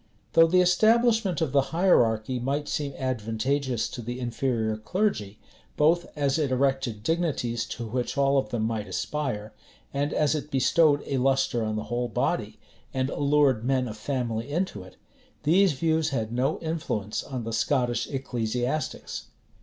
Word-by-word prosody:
[] - - -38
Though 165 0 +7
the 180 +2 +4
establishment 220 0 +3
of 155 -5 0
the 140 - +4
hierarchy 125 - +2
might 140 +4 -2
seem 140 -2 -2
advantageous 130 +1 -1
to 120 - -7
the 120 +2 -5
inferior 120 -2 -1
clergy, 110 - -1 0.4
both 165 +4 +3
as 140 +1 +1
it 145 -3 +1
erected 130 -4 0
dignities 125 -7 -1
to 120 - -5
which 125 +5 -3
all 140 0 +4
of 105 - -3
them 115 -1 -1
might 110 -2 -2
aspire, 125 -8 -3 0.4
and 145 +1 0
as 150 -1 +2
it 150 -1 -3
bestowed 145 +2 +3
a 135 - -1
lustre 135 -2 +1
on 110 0 -2
the 110 - -2
whole 120 0 -1
body, 110 - -1 0.3
and 130 +1 -1
allured 140 -5 +2
men 130 0 +1
of 110 - -6
family 120 0 -3
into 160 - -2
it, 95 0 -14 0.5
these 180 +3 +4
views 160 +2 +1
had 115 -5 -2
no 125 +3 0
influence 150 -11 -3
on 130 -3 -5
the 115 0 -4
Scottish 120 +1 +1
ecclesiastics. 125 0 -3
135 Hz, 160 wpm, -26 LUFS, 115-150 Hz, 0.5 s, Though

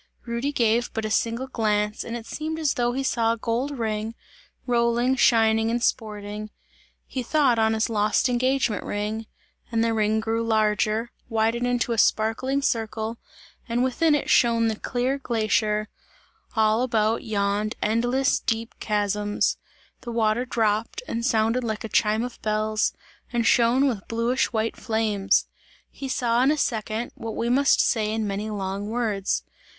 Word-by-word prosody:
Rudy 235 +4 -2
gave 235 -2 +1
but 225 -1 -2
a 215 - -3
single 235 +4 0
glance 210 -4 -1
and 235 +1 -4
it 230 - -9
seemed 315 +4 -4
as 310 -3 +1
though 240 0 0
he 270 +2 -2
saw 230 -3 +1
a - - -5
gold 245 +5 -2
ring, 220 -1 -2 0.5
rolling, 240 +1 +2
shining 225 -3 +4
and 240 +1 -1
sporting 210 -2 -2 0.6
he 260 - -4
thought 255 -2 +2
on 220 0 +3
his 220 - +1
lost 215 +3 +2
engagement 255 -3 +1
ring 215 +2 -3 0.4
and 225 -1 +1
the 230 0 +1
ring 215 0 +1
grew 225 +1 -1
larger, 220 +1 +1 0.2
widened 225 +2 +1
into 245 -1 0
a 230 - 0
sparkling 260 +7 +1
circle 225 -1 -2 0.5
and 240 +2 +1
within 295 +5 +2
it 290 - -2
shone 230 -1 +4
the 220 - -1
clear 255 +5 -1
glacier; 215 -3 0 0.7
all 220 0 +3
about 225 -3 +1
yawned 205 0 -1
endless 245 +5 +1
deep 225 0 -2
chasms; 205 0 0 0.4
the 240 - -7
water 230 +1 +1
dropped 220 - 0
and 230 - -3
sounded 230 0 +2
like 220 -2 -3
a - - -3
chime 215 +1 +2
of 245 -1 -7
bells, 215 0 0 0.4
and 235 -2 0
shone 240 +5 +4
with 220 -7 -3
bluish 235 +3 0
white 225 -1 -1
flames. 215 -3 +1 0.5
He 275 - -6
saw 240 -2 +1
in 265 - +4
a 305 - +2
second, 225 -2 -2
what 225 -1 -6
we 235 - -1
must 275 +3 +4
say 215 -3 +2
in 220 0 -1
many 205 +2 -3
long 200 0 -3
words. 215 -4 -1
225 Hz, 160 wpm, -25 LUFS, 215-245 Hz, 0.7 s, shining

